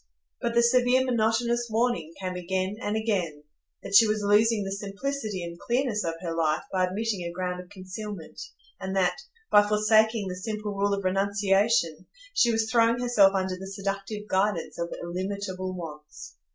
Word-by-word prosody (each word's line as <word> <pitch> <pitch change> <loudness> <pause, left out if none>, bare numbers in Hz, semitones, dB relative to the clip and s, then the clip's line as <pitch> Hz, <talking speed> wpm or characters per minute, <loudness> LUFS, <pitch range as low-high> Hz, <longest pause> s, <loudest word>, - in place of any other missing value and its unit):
But 235 0 -1
the 235 - +5
severe 250 +1 +4
monotonous 235 0 +1
warning 230 -6 0
came 185 -1 -3
again 185 +2 -2
and 210 -2 -1
again,—that 175 -6 -4
she 225 +2 +8
was 215 0 0
losing 210 +1 +3
the 195 - -4
simplicity 205 +1 -4
and 170 0 -7
clearness 240 -3 0
of 165 -1 -2
her 165 -2 -2
life 160 -2 +1
by 185 -1 +2
admitting 205 +1 -2
a 170 0 -4
ground 180 0 -3
of 180 - -16
concealment; 190 -1 -8 0.4
and 190 0 -4
that, 185 +5 +1 0.3
by 205 - +8
forsaking 215 0 +3
the 180 - -4
simple 210 +1 -4
rule 200 0 +1
of 200 - -5
renunciation, 195 -3 +1 0.3
she 240 - +4
was 225 -1 +1
throwing 230 0 +4
herself 210 -6 +4
under 190 -1 0
the 190 +1 -8
seductive 195 +2 -4
guidance 190 -3 0
of 170 0 -3
illimitable 185 +1 -4
wants. 150 - -9
200 Hz, 165 wpm, -27 LUFS, 185-220 Hz, 0.4 s, she